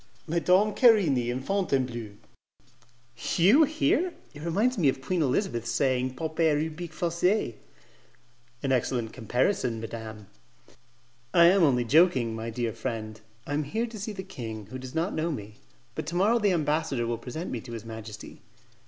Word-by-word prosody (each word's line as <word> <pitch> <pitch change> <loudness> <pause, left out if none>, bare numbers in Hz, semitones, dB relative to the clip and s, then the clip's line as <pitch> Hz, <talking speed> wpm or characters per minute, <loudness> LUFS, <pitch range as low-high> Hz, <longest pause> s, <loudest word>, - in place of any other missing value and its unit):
"Madame 180 +6 +3
Querini 180 - +4
in 125 +2 -2
Fontainebleau?" 130 - -1 1.2
"You 210 - +6
here? 315 +4 +1 0.2
It 150 - -10
reminds 205 +10 +1
me 150 -6 +4
of 130 - -2
Queen 165 +6 -1
Elizabeth 130 - 0
saying, 130 +1 0
"'Pauper 160 +1 +1
ubique 160 +2 -4
facet.'" 170 - 0 1.0
"An 135 - 0
excellent 120 -3 0
comparison, 125 - 0
madam." 110 -1 -7 1.1
"I 170 - +8
am 185 +3 +6
only 125 -7 +3
joking, 130 -5 +4
my 115 +1 -4
dear 115 -1 -2
friend; 110 -3 -5 0.2
I 145 - -4
am 150 - +1
here 220 +11 -2
to 225 -2 -8
see 215 +2 -4
the 190 -2 -6
king, 110 - -7
who 130 - -6
does 130 +2 -9
not 165 +4 0
know 160 +2 -1
me; 105 -6 -7 0.4
but 140 - -5
to 170 - -4
morrow 210 +6 +3
the 205 -3 +2
ambassador 150 -6 0
will 115 0 -2
present 155 +8 -6
me 120 - -3
to 120 - -9
his 115 -1 -7
majesty." 110 -2 -9
140 Hz, 160 wpm, -27 LUFS, 120-180 Hz, 1.2 s, I